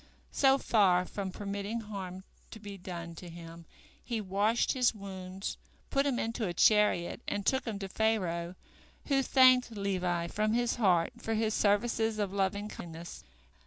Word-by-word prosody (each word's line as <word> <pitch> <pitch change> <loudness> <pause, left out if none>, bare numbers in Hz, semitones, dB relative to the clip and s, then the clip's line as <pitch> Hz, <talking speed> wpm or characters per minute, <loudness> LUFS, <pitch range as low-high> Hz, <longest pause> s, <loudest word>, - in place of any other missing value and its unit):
So 270 -1 +4
far 190 -8 +3
from 195 0 -4
permitting 205 +3 -4
harm 190 -3 -7 0.3
to 220 - -10
be 205 -1 -8
done 175 -3 -7
to 180 - -9
him, 165 0 -11 0.4
he 235 -2 -3
washed 205 +3 +1
his 250 -3 +2
wounds, 190 -1 -6 0.3
put 275 +1 +2
him 265 -3 0
into 230 -2 -2
a 175 - -4
chariot, 210 -3 +3
and 200 -1 -2
took 265 - +1
him 220 -4 -3
to 195 -1 -5
Pharaoh, 185 -5 -1 0.5
who 275 -1 +3
thanked 255 -2 +5
Levi 185 -5 -1
from 215 +5 0
his 240 0 +1
heart 180 -7 +3
for 225 - -2
his 220 0 0
services 220 +2 +1
of 200 -2 -2
loving 200 +1 0
kindness. 170 - -9
200 Hz, 160 wpm, -31 LUFS, 185-225 Hz, 0.5 s, thanked